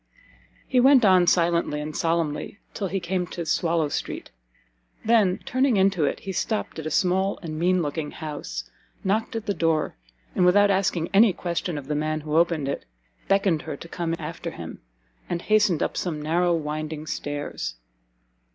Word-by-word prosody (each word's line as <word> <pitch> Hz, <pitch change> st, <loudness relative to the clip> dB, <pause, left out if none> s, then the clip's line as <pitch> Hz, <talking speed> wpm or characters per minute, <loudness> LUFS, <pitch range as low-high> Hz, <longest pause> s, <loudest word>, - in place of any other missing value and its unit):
He 255 Hz, -, +3 dB
went 260 Hz, -2 st, +6 dB
on 185 Hz, -2 st, +5 dB
silently 170 Hz, -4 st, +2 dB
and 150 Hz, +1 st, -5 dB
solemnly 165 Hz, +1 st, -1 dB, 0.2 s
till 200 Hz, -, -2 dB
he 195 Hz, +2 st, -2 dB
came 180 Hz, 0 st, -2 dB
to 170 Hz, -1 st, -5 dB
Swallow 165 Hz, -1 st, +1 dB
street, -, -, -4 dB, 0.7 s
then 215 Hz, -5 st, +4 dB
turning 255 Hz, -2 st, +2 dB
into 190 Hz, -5 st, +3 dB
it, -, -, -2 dB
he 195 Hz, -, -5 dB
stopt 210 Hz, -1 st, -2 dB
at 155 Hz, -, -4 dB
a -, -, -1 dB
small 185 Hz, +5 st, +1 dB
and 155 Hz, -2 st, -5 dB
mean 180 Hz, +1 st, +2 dB
looking 150 Hz, 0 st, -3 dB
house, 145 Hz, -, -6 dB, 0.4 s
knocked 215 Hz, +5 st, 0 dB
at 225 Hz, -, -3 dB
the 200 Hz, -, 0 dB
door, 165 Hz, -4 st, 0 dB, 0.4 s
and -, -, +2 dB
without 200 Hz, +3 st, +5 dB
asking 190 Hz, -4 st, +1 dB
any 205 Hz, 0 st, +6 dB
question 175 Hz, -2 st, -3 dB
of 140 Hz, -, -6 dB
the 150 Hz, -, -1 dB
man 155 Hz, +1 st, -1 dB
who 150 Hz, 0 st, -3 dB
opened 165 Hz, -4 st, +2 dB
it, 140 Hz, -, -3 dB, 0.4 s
beckoned 195 Hz, -5 st, +2 dB
her 140 Hz, -, -6 dB
to 170 Hz, -, -10 dB
come 170 Hz, -1 st, -2 dB
after 165 Hz, +1 st, -5 dB
him, -, -, -8 dB, 0.5 s
and 170 Hz, 0 st, -2 dB
hastened 210 Hz, -6 st, +3 dB
up -, -, -2 dB
some 165 Hz, -4 st, -2 dB
narrow 170 Hz, +3 st, +2 dB
winding 155 Hz, 0 st, -4 dB
stairs. 145 Hz, -, -4 dB
170 Hz, 170 wpm, -25 LUFS, 155-195 Hz, 0.7 s, went